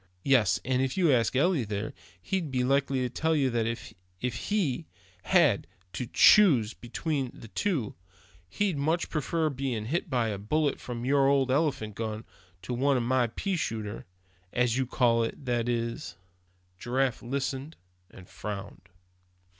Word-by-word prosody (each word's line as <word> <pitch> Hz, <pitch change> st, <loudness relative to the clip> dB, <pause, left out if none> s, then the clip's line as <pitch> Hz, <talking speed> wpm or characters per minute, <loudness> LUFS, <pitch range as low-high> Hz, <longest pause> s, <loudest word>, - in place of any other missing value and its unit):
Yes, 125 Hz, -8 st, +3 dB
and 130 Hz, 0 st, +1 dB
if 135 Hz, +4 st, -1 dB
you 175 Hz, -5 st, +4 dB
asked 120 Hz, 0 st, +2 dB
Eli 155 Hz, 0 st, +3 dB
there, 105 Hz, 0 st, -4 dB, 0.3 s
he'd 165 Hz, -, -2 dB
be 130 Hz, -1 st, 0 dB
likely 135 Hz, 0 st, +1 dB
to 125 Hz, -, -1 dB
tell 160 Hz, +6 st, 0 dB
you 135 Hz, -4 st, +2 dB
that 115 Hz, -1 st, 0 dB
if 95 Hz, -1 st, -6 dB
he 170 Hz, -8 st, 0 dB, 0.4 s
had -, -, +3 dB, 0.3 s
to 125 Hz, -, -4 dB
choose 130 Hz, -, +6 dB
between 135 Hz, +2 st, -3 dB
the 115 Hz, -, -12 dB
two, 160 Hz, -, -1 dB, 0.6 s
he'd 190 Hz, -, -1 dB
much 160 Hz, +5 st, 0 dB
prefer 160 Hz, +1 st, 0 dB
being 130 Hz, -5 st, -3 dB
hit 165 Hz, +8 st, -2 dB
by 120 Hz, -4 st, +1 dB
a 100 Hz, -2 st, -4 dB
bullet 145 Hz, +7 st, 0 dB
from 120 Hz, -1 st, -6 dB
your 135 Hz, 0 st, +3 dB
old 135 Hz, -2 st, +3 dB
elephant 135 Hz, -7 st, 0 dB
gun, 110 Hz, +1 st, -4 dB, 0.4 s
to 125 Hz, -, -4 dB
one 135 Hz, +2 st, +2 dB
from 120 Hz, -, -1 dB
my 125 Hz, -1 st, +2 dB
pea 190 Hz, -, -2 dB
shooter, 110 Hz, -, -4 dB, 0.4 s
as 125 Hz, -2 st, +1 dB
you 130 Hz, -1 st, 0 dB
call 120 Hz, -2 st, +3 dB
it. 115 Hz, +4 st, -5 dB
That's 120 Hz, -1 st, 0 dB, 0.4 s
all." -, -, -31 dB, 0.6 s
Giraffe 125 Hz, +1 st, 0 dB
listened, 135 Hz, +4 st, -3 dB, 0.3 s
and 95 Hz, -, -14 dB
frowned. 100 Hz, -3 st, -7 dB
130 Hz, 155 wpm, -28 LUFS, 115-145 Hz, 0.6 s, choose